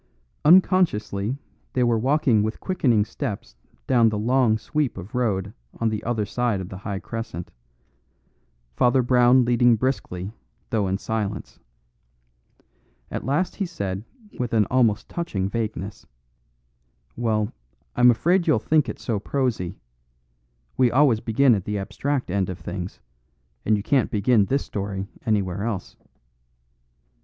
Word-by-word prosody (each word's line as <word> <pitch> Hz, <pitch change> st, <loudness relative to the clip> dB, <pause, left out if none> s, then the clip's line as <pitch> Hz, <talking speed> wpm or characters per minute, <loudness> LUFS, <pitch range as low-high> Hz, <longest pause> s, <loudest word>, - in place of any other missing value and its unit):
Unconsciously 140 Hz, -, +3 dB, 0.4 s
they 125 Hz, -, +2 dB
were 120 Hz, -1 st, +3 dB
walking 130 Hz, -3 st, +3 dB
with 110 Hz, +1 st, -2 dB
quickening 125 Hz, -, +2 dB
steps 110 Hz, -, -5 dB, 0.3 s
down 115 Hz, -, +4 dB
the 105 Hz, -, -2 dB
long 120 Hz, 0 st, +3 dB
sweep 150 Hz, +1 st, -2 dB
of 95 Hz, +3 st, -9 dB
road 105 Hz, -5 st, -1 dB, 0.3 s
on 115 Hz, -, +2 dB
the 110 Hz, -1 st, -3 dB
other 115 Hz, -3 st, -1 dB
side 120 Hz, -1 st, -1 dB
of 95 Hz, -1 st, -6 dB
the 95 Hz, -, -7 dB
high 100 Hz, -1 st, -4 dB
crescent, 115 Hz, -5 st, -6 dB, 1.2 s
Father 125 Hz, -, +3 dB
Brown 125 Hz, 0 st, +5 dB
leading 120 Hz, 0 st, +4 dB
briskly, 105 Hz, -6 st, -2 dB, 0.4 s
though 105 Hz, -4 st, +1 dB
in 95 Hz, +1 st, 0 dB
silence. 105 Hz, -1 st, -4 dB, 1.5 s
At -, -, -4 dB
last 150 Hz, +7 st, 0 dB
he 195 Hz, -, -1 dB
said 100 Hz, -, -4 dB, 0.4 s
with 120 Hz, -2 st, -2 dB
an 110 Hz, -2 st, +4 dB
almost 120 Hz, -5 st, +2 dB
touching 100 Hz, -, -2 dB
vagueness, 105 Hz, -2 st, -4 dB, 1.1 s
"Well, 110 Hz, -2 st, 0 dB, 0.4 s
I'm 125 Hz, 0 st, +6 dB
afraid 170 Hz, +9 st, +2 dB
you'll 155 Hz, -, +4 dB
think 150 Hz, +6 st, +2 dB
it -, -, -5 dB
so 110 Hz, -4 st, -2 dB
prosy. 115 Hz, -7 st, -1 dB, 1.0 s
We 130 Hz, -1 st, +4 dB
always 130 Hz, -3 st, +4 dB
begin 120 Hz, +4 st, +3 dB
at 100 Hz, -4 st, -1 dB
the 105 Hz, 0 st, -2 dB
abstract 130 Hz, +4 st, -2 dB
end 95 Hz, -1 st, 0 dB
of 90 Hz, -, -4 dB
things, 90 Hz, +2 st, -6 dB, 0.7 s
and 110 Hz, 0 st, +3 dB
you 100 Hz, -, -4 dB
can't 135 Hz, +1 st, +2 dB
begin 105 Hz, 0 st, +3 dB
this 135 Hz, +6 st, 0 dB
story 100 Hz, -1 st, -4 dB, 0.2 s
anywhere 100 Hz, -3 st, 0 dB
else. 105 Hz, -4 st, -4 dB
115 Hz, 135 wpm, -24 LUFS, 100-130 Hz, 1.5 s, I'm